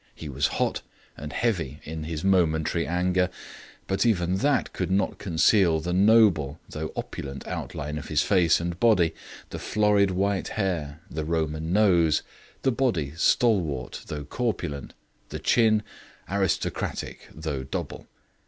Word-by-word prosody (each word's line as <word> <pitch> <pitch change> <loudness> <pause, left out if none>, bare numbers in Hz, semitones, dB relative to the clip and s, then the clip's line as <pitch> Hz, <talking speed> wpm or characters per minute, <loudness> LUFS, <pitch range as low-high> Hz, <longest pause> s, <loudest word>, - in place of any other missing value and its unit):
He 80 - -8
was 70 +1 +1
hot - - 0 0.3
and 75 +1 -7
heavy 85 - -1
in 80 0 -6
his 80 -1 -4
momentary 85 -3 +2
anger, 90 +1 +1 0.6
but 95 - 0
even 95 -6 +1
that 145 +7 +1
could 90 -2 -2
not 95 0 0
conceal 85 -1 +3
the 90 +3 -3
noble 95 -8 +4
though 80 0 -5
opulent 70 -1 -6
outline 75 +1 -4
of 75 - -9
his - - +2
face 90 -5 +3
and 85 +1 -4
body, 95 -9 +4 0.4
the - - -5
florid 105 -2 +2
white 95 +1 0
hair, 85 -7 -2
the 80 0 -3
Roman 80 0 -2
nose, 90 -6 +4 0.4
the 135 - +3
body 110 - 0
stalwart 85 - +1
though 75 -1 -5
corpulent, 90 - -3 0.3
the - - -5
chin 110 -2 +3 0.4
aristocratic 95 -1 -2
though 75 -4 -4
double. 65 - -5
85 Hz, 135 wpm, -26 LUFS, 80-100 Hz, 0.6 s, noble